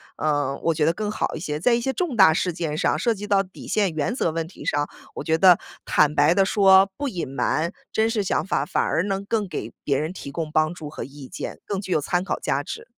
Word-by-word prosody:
呃， 145 -3 0
我 165 - +2
觉 150 -1 +1
得 165 - +3
更 210 +3 -3
好 - - -2
一 - - -5
些。 150 -3 -3
在 235 +8 +3
一 235 - +2
些 265 - 0
重 325 -2 -2
大 190 -7 +7
事 180 +1 0
件 160 -3 -3
上， 155 - +1
涉 230 +8 +1
及 210 -1 -7
到 200 -1 +3
底 185 0 -12
线 200 -5 +1
原 160 +9 -1
则 170 - 0
问 165 0 -3
题 185 - -12
上， 145 0 0 0.3
我 - - -4
觉 160 0 +1
得 180 -1 +6 0.2
坦 150 0 +3
白 150 +4 +5
地 195 0 +3
说， 195 -1 +5
不 285 -2 -2
隐 175 - -4
瞒 145 +6 -1 0.2
真 220 +1 +2
实 215 -3 0
想 190 - 0
法， 135 - +1
反 - - 0
而 165 - +1
能 195 0 -2
更 205 -2 -1
给 - - -5
别 140 -2 +1
人 155 +4 -3
提 140 -6 -8
供 155 +1 -4
帮 155 +2 +1
助 155 -4 -8
和 - - -6
意 140 0 -10
见， - - -7
更 200 -2 -3
具 190 - -7
有 155 - +3
参 175 +5 -1
考 - - -3
价 - - -1
值。 460 +1 -7
175 Hz, 280 characters per minute, -23 LUFS, 155-200 Hz, 0.3 s, 大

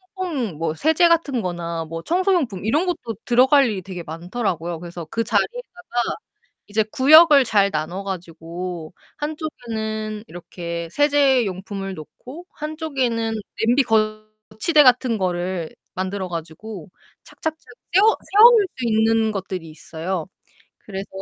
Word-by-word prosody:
퐁퐁 280 - -3
뭐 165 -1 -1
세제 320 - +3
같은 300 -8 +1
거나 170 -2 -4
뭐 165 +1 -6
청소용품 340 - 0
이런 295 +11 +2
것도 245 -11 -3
들어갈 260 +3 +5
일이 205 -4 -3
되게 180 -2 -7
많더라고요. 170 0 -3
그래서 170 -1 -8
그 230 - -1
자리에다가 355 - -2 0.5
이제 215 +1 +1
구역을 295 0 +7
잘 200 -3 +3
나눠 170 +6 -3
가지고 170 -2 -6 0.2
한쪽에는 220 -9 -4
이렇게 170 -2 -6
세제 280 -3 +3
용품을 195 +1 -5
놓고 255 - -11
한쪽에는 270 -8 -2 0.3
냄비 245 +5 +4
거치대 215 +6 +1
같은 250 -3 +4
거를 180 -2 -2 0.2
만들어 190 +1 -3
가지고 170 +3 -7 0.3
착착착 320 -1 -5 0.4
세워 415 +5 +5 0.2
세워 440 +4 +9
놓을 445 -4 +4
수 255 - -3
있는 220 0 +2
것들이 185 -4 -5
있어요. 165 +2 -5 0.5
그래서 195 -1 -7
215 Hz, 295 characters per minute, -22 LUFS, 175-280 Hz, 0.5 s, 세워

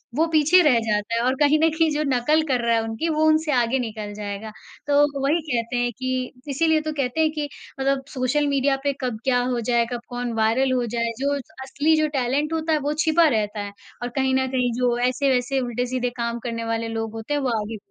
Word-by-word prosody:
वो 320 +3 +3
पीछे 320 +3 +5
रह 285 -8 +4
जाता 210 +1 0
है 230 - +1
और 260 +1 +2
कहीं 295 +1 +4
न 325 - +5
कहीं 320 0 +1
जो 300 +1 0
नकल 300 +6 +2
कर 250 -2 +2
रहा 235 0 +3
है 225 - +2
उनकी, 225 +9 -3
वो 310 0 +2
उनसे 310 0 +3
आगे 250 0 +2
निकल 215 -3 -5
जाएगा। 205 +1 -6 0.4
तो, 285 -1 +2
वही 300 +5 +2
कहते 235 0 -1
हैं 245 - 0
कि 255 -1 -2 0.2
इसीलिए 315 +2 +2
तो 310 0 -3
कहते 280 +1 -1
हैं 315 -1 +3
कि 300 -1 -3 0.3
मतलब 270 0 0
सोशल 265 +3 +1
मीडिया 275 0 +2
पे 285 -1 +1
कब 245 -4 -3
क्या 250 -2 +2
हो 240 - -1
जाए, 235 -1 +3
कब 240 - -4
कौन 245 -1 -3
वायरल 250 +5 +2
हो 250 -1 +1
जाए, 230 0 0
जो 280 +1 0 0.3
असली 290 +4 +1
जो 310 0 +2
टैलेंट 275 +5 0
होता 320 0 0
है, 305 - +2
वो 290 +1 -1
छिपा 320 +1 +5
रहता 210 0 -2
है 205 0 -6 0.3
और 245 - -3
कहीं 265 -1 +1
न 260 0 +1
कहीं 250 -2 0
जो 245 -1 +2
ऐसे-वैसे 260 0 +1
उल्टे-सीधे 245 +1 -2
काम 235 0 -2
करने 230 -1 -3
वाले 225 0 -2
लोग 225 -1 -4
होते 225 +5 -4
हैं, 290 - 0
वो 265 - 0
आगे 215 +1 -5
260 Hz, 230 wpm, -23 LUFS, 235-295 Hz, 0.4 s, पीछे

